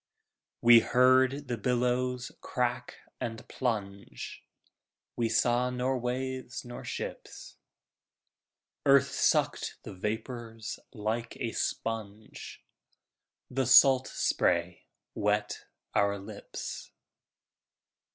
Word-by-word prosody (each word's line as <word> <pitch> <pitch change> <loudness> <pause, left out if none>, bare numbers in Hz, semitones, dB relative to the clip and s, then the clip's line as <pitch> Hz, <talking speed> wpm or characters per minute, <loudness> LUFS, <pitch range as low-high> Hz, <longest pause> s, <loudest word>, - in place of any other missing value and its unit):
We 120 0 +9
heard 130 +3 +3
the 120 -3 -3
billows 125 +2 0
crack - - -2 0.2
and 115 -1 -5
plunge, 100 - -4 0.7
We 115 -1 0
saw 120 +2 +2
nor 125 +1 -1
waves 130 +1 -4
nor 120 0 -8
ships. - - -7 1.3
Earth 140 -1 +5
sucked - - +1
the - - -8
vapors 110 +2 -5
like 110 +3 -3
a 115 - -3
sponge, 110 -2 -5 0.9
The 130 -1 0
salt 130 0 +7
spray 85 0 0 0.3
wet 105 0 -1 0.3
our 100 0 +2
lips. 100 - -7
120 Hz, 85 wpm, -30 LUFS, 110-125 Hz, 1.3 s, We